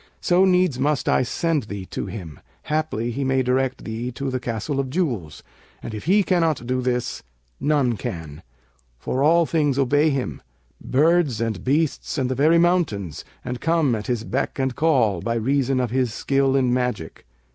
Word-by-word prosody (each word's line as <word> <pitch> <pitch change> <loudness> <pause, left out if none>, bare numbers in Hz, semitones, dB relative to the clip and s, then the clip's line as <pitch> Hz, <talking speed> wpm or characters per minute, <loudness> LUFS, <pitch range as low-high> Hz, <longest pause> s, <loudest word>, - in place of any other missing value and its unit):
So 180 +2 +3
needs 180 -7 +2
must 145 0 0
I - - +3
send 150 +3 -1
thee 100 -2 -6
to - - -4
him; 85 -9 -8 0.2
haply 150 -7 -1
he 135 +4 -3
may 130 0 +1
direct 130 +1 0
thee 115 +3 -4
to 135 +1 -3
the 130 - -1
Castle 120 +4 -3
of 135 -1 -1
Jewels; 125 - -2 0.4
and, 115 - -6
if 105 - -6
he 200 +4 +4
cannot 165 -9 +1
do 130 +1 -1
this, 125 -1 -2 0.4
none 140 -5 +1
can; 80 -4 -6 0.6
for 130 - -2
all 165 +3 +4
things 150 -4 +1
obey 145 +3 +3
him, 135 -3 -3 0.4
birds 150 -3 +2
and 110 -5 -2
beasts 150 +3 0
and 130 -2 0
the - - +2
very 155 +6 +4
mountains 150 - +1 0.2
and 125 0 -4
come 160 -5 +2
at 105 -2 -3
his 120 -3 -1
beck 135 +3 -2
and 130 -2 -1
call, 125 - +2
by 115 +4 -1
reason 135 +3 +1
of 125 -3 -1
his 130 -2 +1
skill 135 +3 +1
in 130 -2 +2
magic. 125 - -3
130 Hz, 180 wpm, -23 LUFS, 115-150 Hz, 0.6 s, he